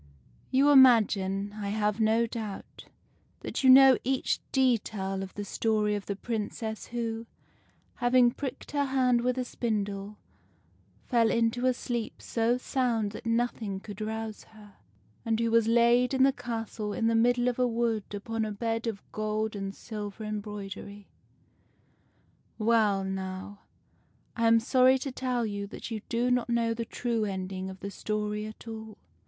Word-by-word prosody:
You 275 Hz, +3 st, +4 dB
imagine, 205 Hz, -7 st, +5 dB
I 205 Hz, -1 st, -3 dB
have 210 Hz, 0 st, 0 dB
no 225 Hz, +1 st, +3 dB
doubt, 220 Hz, -3 st, -7 dB, 0.6 s
that -, -, -4 dB
you 260 Hz, -, +6 dB
know 265 Hz, 0 st, +8 dB
each 265 Hz, +1 st, 0 dB
detail 215 Hz, -7 st, 0 dB
of 190 Hz, -1 st, -7 dB
the 205 Hz, -, -4 dB
story 215 Hz, 0 st, 0 dB
of 205 Hz, -1 st, -4 dB
the 200 Hz, -, -2 dB
Princess 220 Hz, 0 st, -4 dB
who, 230 Hz, -1 st, -4 dB, 0.7 s
having 245 Hz, 0 st, +4 dB
pricked 270 Hz, +1 st, -6 dB
her 285 Hz, -1 st, +1 dB
hand 255 Hz, -3 st, +2 dB
with 250 Hz, +1 st, 0 dB
a 255 Hz, -, -1 dB
spindle, 205 Hz, -4 st, -3 dB, 0.9 s
fell 230 Hz, -2 st, +3 dB
into 230 Hz, +2 st, +1 dB
a 255 Hz, -, +4 dB
sleep 240 Hz, -2 st, -4 dB
so 235 Hz, +1 st, 0 dB
sound 240 Hz, -5 st, 0 dB
that 220 Hz, -, -8 dB
nothing 230 Hz, -4 st, -1 dB
could 205 Hz, +1 st, -9 dB
rouse 220 Hz, 0 st, -4 dB
her, 210 Hz, -2 st, -17 dB, 0.5 s
and 225 Hz, -1 st, 0 dB
who 230 Hz, -1 st, +1 dB
was 230 Hz, -1 st, +4 dB
laid 235 Hz, +2 st, +4 dB
in 260 Hz, -, +4 dB
the 270 Hz, 0 st, +5 dB
castle 225 Hz, -4 st, -4 dB
in 225 Hz, -, -1 dB
the 230 Hz, -, +3 dB
middle 240 Hz, +2 st, +3 dB
of 250 Hz, 0 st, -1 dB
a 250 Hz, -, +3 dB
wood 230 Hz, -2 st, 0 dB
upon 225 Hz, +2 st, -3 dB
a 215 Hz, -, -2 dB
bed 225 Hz, +2 st, -2 dB
of 215 Hz, -3 st, -4 dB
gold 215 Hz, 0 st, -2 dB
and 195 Hz, 0 st, -5 dB
silver 210 Hz, -1 st, -7 dB
embroidery, 205 Hz, -1 st, -6 dB, 0.8 s
— -, -, -39 dB, 0.7 s
well, 215 Hz, -3 st, +2 dB
now, 190 Hz, +1 st, -5 dB, 0.8 s
I 230 Hz, -1 st, +2 dB
am 230 Hz, 0 st, +6 dB
sorry 255 Hz, +2 st, +4 dB
to 270 Hz, +1 st, -5 dB
tell 250 Hz, -2 st, -1 dB
you 200 Hz, -1 st, -4 dB
that 215 Hz, -, -8 dB
you 220 Hz, -2 st, -3 dB
do 240 Hz, +1 st, +1 dB
not 245 Hz, -1 st, +1 dB
know 230 Hz, -1 st, +1 dB
the 230 Hz, 0 st, -4 dB
true 235 Hz, -1 st, -2 dB
ending 190 Hz, -1 st, -4 dB
of 190 Hz, 0 st, -10 dB
the 200 Hz, -, -5 dB
story 210 Hz, +1 st, -3 dB
at 215 Hz, +2 st, -12 dB
all. 220 Hz, -1 st, -8 dB
225 Hz, 160 wpm, -28 LUFS, 210-240 Hz, 0.9 s, know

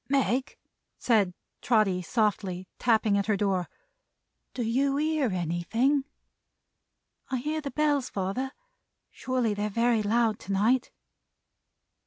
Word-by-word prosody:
"Meg," 265 Hz, -1 st, 0 dB, 0.4 s
said 210 Hz, -6 st, +2 dB, 0.3 s
Trotty, 215 Hz, -6 st, +2 dB
softly; 190 Hz, -2 st, -1 dB
tapping 220 Hz, -3 st, +3 dB
at 200 Hz, -, -2 dB
her 215 Hz, -2 st, +2 dB
door. 190 Hz, -3 st, 0 dB, 0.9 s
"Do 245 Hz, -, -1 dB
you 270 Hz, +5 st, +1 dB
hear 305 Hz, -3 st, +1 dB
anything?" 190 Hz, -, 0 dB, 1.2 s
"I 260 Hz, -, 0 dB
hear 305 Hz, +5 st, -2 dB
the 285 Hz, -, -4 dB
Bells, 290 Hz, -1 st, +1 dB
father. 200 Hz, +8 st, -2 dB, 0.6 s
Surely 255 Hz, -4 st, -1 dB
they're 205 Hz, +1 st, -2 dB
very 230 Hz, +1 st, +2 dB
loud 220 Hz, 0 st, +1 dB
to 195 Hz, -, -5 dB
night." 235 Hz, +6 st, +2 dB
225 Hz, 115 wpm, -28 LUFS, 200-260 Hz, 1.2 s, tapping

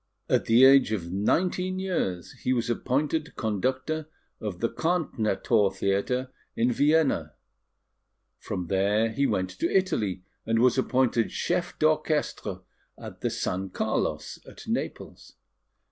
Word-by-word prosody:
At -, -, +2 dB
the 120 Hz, +3 st, +6 dB
age 135 Hz, -4 st, +6 dB
of 85 Hz, -5 st, -3 dB
nineteen 180 Hz, -, 0 dB
years, 130 Hz, -, -2 dB
he 130 Hz, -, +1 dB
was 120 Hz, -1 st, 0 dB
appointed 150 Hz, +6 st, -1 dB
conductor 130 Hz, +8 st, -2 dB, 0.3 s
of 100 Hz, -5 st, -5 dB
the 115 Hz, -, +1 dB
Karnthnerthor 115 Hz, -, +1 dB
Theatre 100 Hz, +7 st, -1 dB, 0.2 s
in 120 Hz, +2 st, +2 dB
Vienna. 140 Hz, -, +2 dB, 1.0 s
From 90 Hz, -, -4 dB
there 100 Hz, +5 st, +1 dB
he 140 Hz, +5 st, +1 dB
went 95 Hz, 0 st, -1 dB
to 95 Hz, -, -2 dB
Italy, 105 Hz, -, 0 dB, 0.2 s
and 115 Hz, 0 st, 0 dB
was 125 Hz, +3 st, +4 dB
appointed 125 Hz, -3 st, +1 dB
Chef 175 Hz, 0 st, -2 dB
d'Orchestre 155 Hz, -, 0 dB, 0.4 s
at -, -, -10 dB
the -, -, 0 dB
San 95 Hz, +1 st, -3 dB
Carlos -, -, -2 dB
at -, -, -12 dB
Naples. -, -, -5 dB
120 Hz, 125 wpm, -27 LUFS, 100-150 Hz, 1.0 s, the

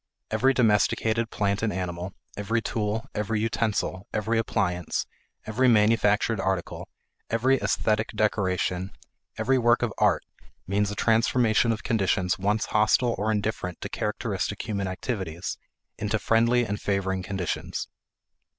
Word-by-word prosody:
Every 135 Hz, +1 st, +3 dB
domesticated 115 Hz, -1 st, +2 dB
plant 100 Hz, -1 st, 0 dB
and 110 Hz, -2 st, 0 dB
animal, 90 Hz, 0 st, -4 dB, 0.2 s
every 110 Hz, +3 st, 0 dB
tool, 110 Hz, 0 st, -2 dB
every 105 Hz, +1 st, -1 dB
utensil, 110 Hz, -4 st, -1 dB
every 110 Hz, +2 st, 0 dB
appliance, 90 Hz, -6 st, -1 dB, 0.4 s
every 125 Hz, +4 st, +2 dB
manufactured 110 Hz, -1 st, +3 dB
article, 95 Hz, -2 st, -2 dB, 0.4 s
every 130 Hz, +4 st, +3 dB
esthetic 110 Hz, 0 st, +1 dB
decoration, 95 Hz, -3 st, 0 dB, 0.4 s
every 130 Hz, +4 st, +2 dB
work 120 Hz, 0 st, +3 dB
of 115 Hz, -4 st, -1 dB
art -, -, +3 dB, 0.4 s
means 100 Hz, +1 st, +1 dB
a 105 Hz, -, -4 dB
transformation 115 Hz, 0 st, +3 dB
of 110 Hz, -, -3 dB
conditions 95 Hz, -4 st, +1 dB
once 105 Hz, +3 st, +1 dB
hostile 110 Hz, +3 st, +3 dB
or 110 Hz, +2 st, +1 dB
indifferent 105 Hz, -4 st, -2 dB
to -, -, -4 dB
characteristic -, -, -3 dB
human 100 Hz, -3 st, -2 dB
activities 95 Hz, -3 st, -4 dB, 0.4 s
into 105 Hz, +1 st, 0 dB
friendly 115 Hz, +3 st, +3 dB
and 105 Hz, -1 st, -4 dB
favoring 95 Hz, -1 st, -1 dB
conditions. 95 Hz, -2 st, -3 dB
105 Hz, 125 wpm, -26 LUFS, 95-115 Hz, 0.4 s, Every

